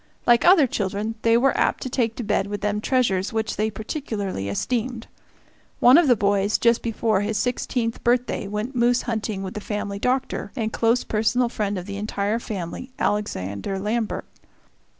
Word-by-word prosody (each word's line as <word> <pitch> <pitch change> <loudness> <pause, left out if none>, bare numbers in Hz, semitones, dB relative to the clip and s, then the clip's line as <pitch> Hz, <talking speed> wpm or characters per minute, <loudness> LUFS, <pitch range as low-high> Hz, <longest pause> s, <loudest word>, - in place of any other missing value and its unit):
Like 240 -1 +5
other 350 -5 +7
children, 210 -1 -2
they 230 0 +4
were 265 +3 +3
apt - - +1
to - - -3
take 235 -3 0
to 245 - -4
bed 205 -2 0
with 205 0 -4
them 210 0 -1
treasures 210 -7 +1
which 220 -1 -2
they 215 +1 0
particularly 210 - -4
esteemed. 235 - -2 0.7
One 250 +2 +7
of 335 -1 +6
the 245 - +6
boys, 200 0 +2
just 235 0 +3
before 225 -3 0
his 210 +1 -1
sixteenth 245 -1 -1
birthday, 240 -3 +1
went 210 +6 -4
moose 240 0 +3
hunting 215 -4 -3
with 190 - -5
the 210 - -5
family 205 -1 -4
doctor, 255 +4 -1
and 225 -4 -2
close 230 +2 +2
personal 235 +3 +1
friend 205 -3 -2
of 180 - -5
the 200 0 -6
entire 210 +1 -1
family, 200 +2 -6
Alexander 195 - -2
Lambert. 215 +3 -2
220 Hz, 170 wpm, -23 LUFS, 205-240 Hz, 0.7 s, other